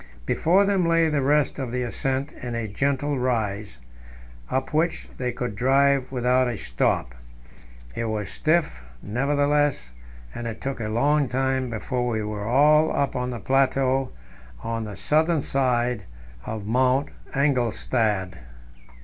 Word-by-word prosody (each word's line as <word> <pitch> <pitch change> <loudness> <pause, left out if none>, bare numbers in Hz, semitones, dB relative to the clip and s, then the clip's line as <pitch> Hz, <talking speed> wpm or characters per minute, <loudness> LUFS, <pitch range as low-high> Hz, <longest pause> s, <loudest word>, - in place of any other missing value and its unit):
Before 185 - +3
them 195 -2 +2
lay 165 -1 +3
the 150 -2 +1
rest 145 +2 +2
of 130 -3 -3
the 125 0 -1
ascent 135 +5 -2
in 120 -1 -6
a 115 -1 -2
gentle 140 +5 -1
rise, 110 - -2 0.7
up 130 +2 -2
which 160 +2 0
they 125 -1 -1
could 120 -3 -4
drive 135 +2 +2
without 125 0 +2
a 120 -3 -3
stop. - - -1 0.8
It 115 - -2
was 110 -3 -2
stiff, 155 - 0 0.2
nevertheless, 145 - +1 0.4
and 120 - -5
it 115 - -6
took 135 -2 -4
a 110 -2 -3
long 140 +5 +2
time 130 0 0
before 125 +2 -2
we 110 -3 -1
were 105 0 -4
all 150 +5 +5
up 140 - 0
on 125 0 -1
the 120 -2 -5
plateau 135 0 +1 0.5
on 115 -1 -3
the 105 -2 -7
southern 155 +1 +2
side 125 -5 0 0.4
of 110 -2 -5
Mount 130 +5 +2 0.3
Engelstad. 115 - 0
130 Hz, 140 wpm, -24 LUFS, 115-140 Hz, 0.8 s, all